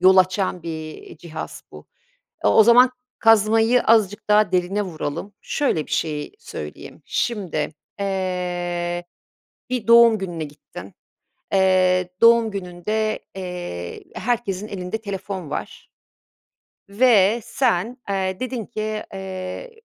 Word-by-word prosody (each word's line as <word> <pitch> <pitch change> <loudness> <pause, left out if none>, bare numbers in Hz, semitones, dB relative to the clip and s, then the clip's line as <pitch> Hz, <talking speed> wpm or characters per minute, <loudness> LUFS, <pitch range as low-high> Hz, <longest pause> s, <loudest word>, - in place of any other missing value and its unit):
yol 190 +1 +6
açan 185 -1 +2
bir, 170 - -5 0.2
iii, - - -12
cihaz 160 -2 -7
bu. - - -12 0.6
Iıı, - - +5
o 220 - +8
zaman 245 +3 +7 0.3
kazmayı 225 +2 +4
azıcık 210 -3 +2
daha 210 -2 +4
derine 185 +3 +1
vuralım. 180 +1 -5
Şöyle 170 - 0
bir - - -14
şey 150 0 -2
söyleyeyim: 465 - -9
Şimdi, 185 -10 -2 0.3
eee, 180 -2 -2 0.7
bir 250 -3 -2
doğum 235 -1 +7
gününe 175 -4 -4
gittin. 140 -10 -11 0.6
Eee, 185 -1 +3
doğum 230 -1 +6
gününde, 200 +3 -2 0.2
eee, 175 - -6
herkesin 215 -4 -2
elinde 185 +2 -4
telefon 195 -5 -5
var 150 - -6 1.0
ve 215 0 +4
sen, 240 -2 0
eee, 190 0 -1
dedin 250 -4 -3
ki, 215 0 -4
eee, 190 - -7
195 Hz, 115 wpm, -22 LUFS, 180-220 Hz, 1.0 s, o